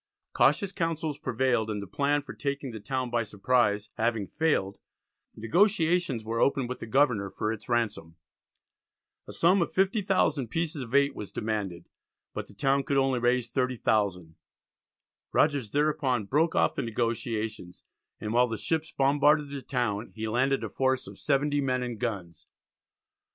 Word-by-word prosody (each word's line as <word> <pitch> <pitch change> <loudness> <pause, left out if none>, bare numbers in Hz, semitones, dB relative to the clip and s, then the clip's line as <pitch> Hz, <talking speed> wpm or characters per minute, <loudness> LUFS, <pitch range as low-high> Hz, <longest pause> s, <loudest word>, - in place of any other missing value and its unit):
Cautious 200 -2 +3
counsels 160 -5 -2
prevailed, 120 -2 0
and 105 -1 -2
the 100 - -5
plan 145 +8 0
for - - -9
taking 140 -2 -3
the 110 - -7
town 130 +2 -3
by 120 -1 +1
surprise 105 0 +1
having 115 -2 0
failed, 100 - 0 0.6
negotiations 170 - +2
were 115 +1 -2
opened 135 -2 +2
with 125 - -5
the - - -7
governor 120 -6 +2
for 105 +3 -2
its 115 - -10
ransom. 110 -9 -1 1.1
A - - -7
sum 180 +3 +3
of 170 - -1
50,000 190 - +1
pieces 160 +2 -2
of 125 +1 -5
eight 140 0 +4
was 105 - -8
demanded, 105 -5 -3 0.5
but - - -5
the 100 - -16
town 135 +5 +2
could 140 0 -1
only 135 -2 +2
raise 120 0 +1
30,000. 105 - 0 1.0
Rogers 140 -7 +2
thereupon 140 -6 +1
broke 155 +9 +1
off - - +3
the - - -2
negotiations 110 -4 -3 0.4
and 105 +1 -4
while 125 +1 +4
the 115 -1 -4
ships 160 +9 -2
bombarded 145 +2 +3
the 140 -1 -6
town 120 -6 -2
he 110 0 -3
landed 130 +5 +1
a - - -3
force 130 -1 0
of - - -11
70 145 0 +1
men 130 -2 0
and 120 -3 -5
guns. 90 -9 -5
125 Hz, 155 wpm, -28 LUFS, 110-145 Hz, 1.1 s, eight